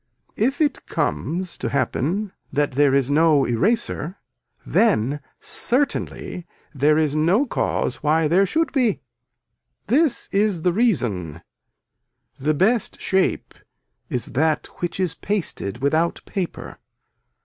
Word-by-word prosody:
If 265 +7 0
it 295 -2 0
comes 180 +2 -2
to - - -2
happen 180 +8 -1 0.2
that 145 0 0
there 140 +1 +3
is 135 0 +2
no 150 -2 +4
eraser 185 - 0 0.5
then 145 - +2 0.2
certainly 245 -8 -1 0.3
there 150 +2 +3
is 155 -2 +1
no 175 - +3
cause - - -1
why 155 +1 +2
there 190 +5 +3
should 325 - 0
be. 250 -7 +1 0.8
This 285 0 +1
is 200 -4 +1
the 180 - +2
reason. 110 - 0 1.0
The 150 +3 +1
best 225 +7 +1
shape 190 0 0 0.6
is 125 - -2
that 155 +3 +1
which 175 +1 -3
is 185 -4 0
pasted 135 - -3
without 160 +4 +1
paper. 185 -4 -5
170 Hz, 115 wpm, -22 LUFS, 145-210 Hz, 1.0 s, no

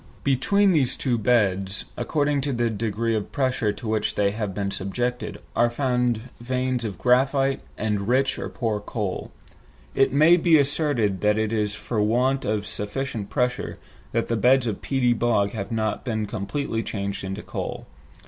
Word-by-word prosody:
Between 195 +10 +3
these 145 -8 +2
two 120 -3 0
beds, 100 -4 +1
according 145 -2 0
to 140 0 -1
the 120 -1 +1
degree 115 +1 -1
of 110 -2 -2
pressure 130 -5 +1
to 115 - -8
which 110 -1 0
they 100 -1 +2
have 105 -1 -3
been 100 +1 -2
subjected, 120 +5 -2 0.2
are 120 0 +4
found 125 -2 0 0.2
veins 125 0 -1
of 105 -4 -4
graphite 135 +2 +2 0.2
and 105 -2 -1
rich 135 +2 +2
or - - -4
poor 110 -4 -2
coal. 105 -2 -4 0.6
It 135 - +3
may 155 +5 +6
be 165 -2 +5
asserted 140 - +1
that 105 0 +3
it 110 0 0
is 105 -2 0
for 110 0 -2
want 125 +5 +2
of 105 0 -1
sufficient 105 0 -4
pressure 125 +3 -1 0.3
that 115 -2 0
beds 130 0 +5
of 110 -4 -3
peaty 125 -3 +2
bog 110 -4 +1
have 110 +1 -5
not 110 -2 -1
been 110 -4 -1
completely 115 +4 -3
changed 100 -3 -4
into 95 +2 -5
coal. - - -5
115 Hz, 165 wpm, -24 LUFS, 105-130 Hz, 0.6 s, may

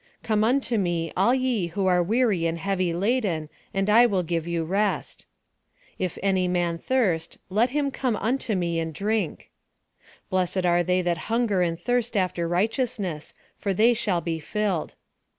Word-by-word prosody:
" - - -40
Come 215 -1 +1
unto 245 -1 +1
me, 170 -3 -1
all 200 +7 +3
ye 250 -8 0
who 195 +3 -2
are 180 -1 +4
weary 205 -3 +2
and 165 0 -2
heavy 185 0 -1
laden, 185 -4 0 0.2
and 195 0 -1
I 230 +3 +6
will 190 -5 0
give 165 -1 -2
you 170 -1 -1
rest." 200 +5 -1 0.4
" - - -34
Jf 185 -2 -2
any 190 -2 +2
man 175 -2 0
thirst, 190 -11 0
let 220 +6 +3
him 280 +1 0
come 255 -4 -1
unto 225 0 -1
me 170 -2 0
and 160 -1 -4
drink." 210 -4 -2 0.4
" - - -29
Blessed 185 0 0
are 175 0 +3
they 180 +1 +1
that 175 -2 0
hunger 225 -5 +1
and 165 -1 0
thirst 240 +1 0
after 180 -3 0
righteousness, 200 - -1 0.2
for 195 -2 -2
they 230 +5 +5
shall 200 -6 0
be 165 0 -3
filled." 195 0 -2
190 Hz, 175 wpm, -25 LUFS, 170-225 Hz, 0.4 s, I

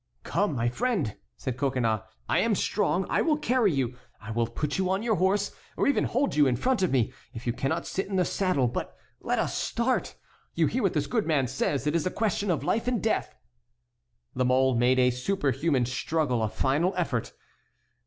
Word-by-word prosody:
"Come, 200 -7 0
my 120 -1 0
friend," 180 - -1 0.2
said 130 -2 -4
Coconnas, 125 -5 0 0.3
"I - - +2
am 225 -2 +2
strong, 190 -2 0
I - - +1
will 310 -2 +2
carry 250 -8 +2
you, 130 -4 -1 0.2
I 110 -1 -8
will 115 +1 0
put 145 +8 -3
you 185 -1 +1
on 190 +3 0
your 225 -4 +1
horse, 195 +2 +1 0.3
or - - +2
even 280 - +2
hold 270 +4 0
you 150 -2 +5
in 125 - +2
front 250 - +1
of 185 - +2
me, 125 -2 +1 0.2
if 115 - -7
you 120 - 0
cannot 135 +7 -2
sit 195 - -3
in 195 - -3
the 180 -1 +3
saddle; 185 -11 +1
but 120 - -4 0.2
let - - -1
us - - -1
start. 240 +2 -1 0.4
You - - +3
hear - - 0
what - - +1
this - - 0
good 225 -4 -1
man 150 -5 +2
says; 135 +2 -1
it 150 - +1
is 170 +1 +1
a - - +1
question 205 -1 -1
of 170 - 0
life 230 +2 0
and 245 -2 +1
death." 220 - -1 1.0
La 130 - 0
Mole 130 +1 +3
made 125 +2 +3
a 125 0 +4
superhuman 140 -1 0
struggle, 130 0 -1
a 110 - 0
final 150 - +1
effort. 130 -10 -1
150 Hz, 205 wpm, -27 LUFS, 125-200 Hz, 1.0 s, you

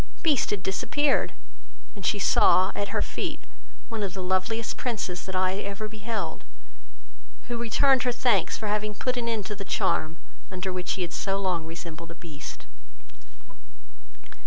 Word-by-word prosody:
Beast 300 -6 +3
had 205 -3 -1
disappeared, 285 +8 +2 0.6
and 200 - -9
she 205 - +2
saw, 185 -1 +5
at 200 - -1
her 210 +1 +1
feet, - - -3 0.5
one 225 -2 -3
of 195 -2 -2
the 190 - -3
loveliest 190 +5 0
Princes 195 -8 -2
that 190 - -4
eye 185 +1 +2
ever 200 +1 -3
beheld, 210 - -4 1.1
who 240 - -1
returned 250 +3 +4
her 250 - +2
thanks 245 0 +2
for 220 - -3
having 210 0 0
put 255 +4 0
an 235 -1 -1
end 220 -4 -1
to 210 - -3
the 200 - -5
charm, 160 -4 +1 0.3
under 185 0 -3
which 180 0 -1
he 190 - -1
had 175 - -4
so 195 0 0
long 180 -4 0
resembled 165 0 -7
a 170 - -8
Beast. 155 -3 -8
200 Hz, 160 wpm, -27 LUFS, 185-225 Hz, 1.1 s, saw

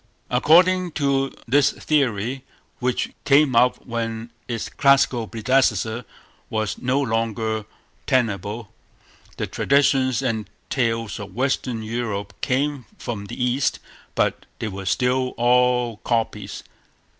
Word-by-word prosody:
According 175 +7 +4
to 135 -2 +1 0.2
this 140 +4 +4
theory, 130 -3 0 0.4
which 125 0 -1
came 140 -2 +4
up 125 +2 +3
when 115 -1 -4 0.2
its 115 -2 -3
classical 135 -4 +3
predecessor 115 -1 +1 0.4
was 110 -3 -2
no 130 +2 +1
longer 110 -3 -1 0.4
tenable, 110 -2 -1 0.6
the - - -1
traditions 135 -2 +2
and 110 -4 -2 0.2
tales 115 -4 0
of 100 -2 -8
Western 125 -3 -1
Europe 110 -2 -3
came 140 0 0
from 105 -4 -5
the - - -8
East, 125 +2 +1 0.4
but - - 0
they 110 - -3
were 95 -1 -7
still 125 +5 +1
all 125 -1 +3
copies. 115 0 -2
120 Hz, 110 wpm, -23 LUFS, 110-135 Hz, 0.6 s, According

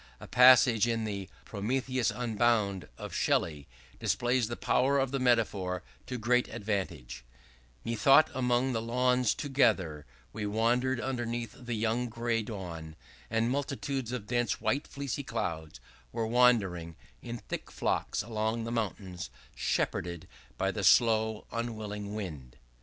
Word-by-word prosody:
A - - -10
passage 125 -2 +6
in 115 -1 0
the 100 -3 -4 0.2
'Prometheus 125 +4 -1
Unbound,' 110 -3 +1
of - - -7
Shelley, 75 -4 0 0.3
displays 120 -1 +1
the 120 - -4
power 135 +4 +2
of 135 -1 +1
the 135 - -1
metaphor 105 -7 +1 0.2
to 125 - -3
great 125 +2 +2
advantage: 95 - -4 0.6
"Methought 135 +7 +5
among 125 0 +1
the 115 - -1
lawns 125 +1 +2
together 100 - +1 0.3
We 105 - -3
wandered, 120 +4 +1
underneath 120 -2 -3
the 120 -2 -5
young 115 +3 0
gray 115 0 -1
dawn, 85 -7 -7 0.3
And 115 +2 +1
multitudes 135 -2 -2
of 125 -5 -4
dense 120 -2 0
white 125 +7 0
fleecy 140 0 -4
clouds 80 - -4 0.3
Were 115 - -1
wandering, 105 -9 +3 0.3
in 120 0 -5
thick - - -6
flocks - - -1
along 110 0 -2
the 115 - -4
mountains 95 - -3 0.2
Shepherded 85 -1 -2 0.3
by 95 +1 +1
the 100 +1 -4
slow 110 +2 +4
unwilling 105 -3 -4
wind." 75 - -7
115 Hz, 130 wpm, -30 LUFS, 100-125 Hz, 0.6 s, passage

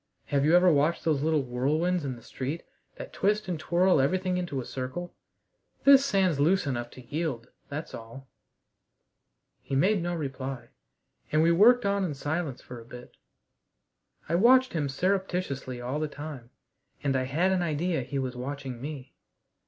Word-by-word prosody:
"Have 140 -1 +2
you 155 +3 +3
never 180 0 +6
watched 155 +3 +2
those 155 -4 +2
little 155 -1 +2
whirlwinds 150 +8 0
in 135 -3 -3
the 115 - -15
street 140 +6 -5 0.3
that - - -9
twist 210 +1 +1
and 175 -4 -2
twirl 175 0 +3
everything 185 +6 0
into 170 -7 -3
a 125 - -5
circle? 130 +7 -5 0.7
This 275 -1 +8
sand's 190 - +2
loose 175 +5 +3
enough 120 -3 -3
to 130 - -12
yield, 145 -4 -3 0.2
that's 150 +2 -6
all." 115 +4 -10 1.3
He 135 - -4
made 190 +7 +3
no 175 +1 -2
reply, 135 -5 -5 0.6
and 155 +1 +3
we 165 - +4
worked 235 +7 +6
on 200 0 +1
in 160 -6 -2
silence 145 -1 -3
for 125 -1 -9
a - - -14
bit. 125 +1 -12 1.1
I 165 - -2
watched 255 +8 +5
him 150 -4 -1
surreptitiously 180 -6 -2
all 125 +4 -3
the 155 - -1
time, 145 -5 -8 0.5
and 135 -2 +1
I 130 0 +1
had 165 +8 +1
an 185 -1 +1
idea 165 -1 0
he 135 +3 -4
was 130 -1 -2
watching 130 -1 -6
me. 140 -2 -7
150 Hz, 170 wpm, -28 LUFS, 130-180 Hz, 1.3 s, This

